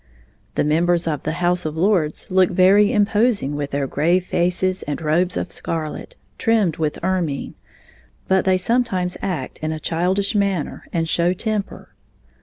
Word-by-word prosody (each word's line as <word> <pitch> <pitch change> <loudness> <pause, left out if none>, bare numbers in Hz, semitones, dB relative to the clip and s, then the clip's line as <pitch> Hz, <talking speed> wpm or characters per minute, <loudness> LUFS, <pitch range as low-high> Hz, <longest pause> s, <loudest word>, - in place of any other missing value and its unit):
The - - +2
members 170 +3 +2
of 150 -4 -2
the 155 - -3
House 175 +1 0
of 155 0 -4
Lords 175 -4 0
look 185 -1 +4
very 195 +4 +5
imposing 210 - +2
with 145 -1 -3
their 140 0 -1
grave 170 +7 +1
faces 180 +2 0
and 145 - -4
robes 165 +3 +1
of - - -3
scarlet, 165 - -4 0.2
trimmed 215 -9 +2
with 155 -2 -1
ermine, 175 -6 -1 0.7
but 190 0 +3
they 190 -1 +3
sometimes 190 -3 0
act 175 -9 -4
in 155 0 -2
a 155 - -4
childish 185 +6 0
manner 200 -7 -1
and 165 -1 -1
show 170 +2 +2
temper. 210 +1 -4
180 Hz, 155 wpm, -21 LUFS, 155-195 Hz, 0.7 s, very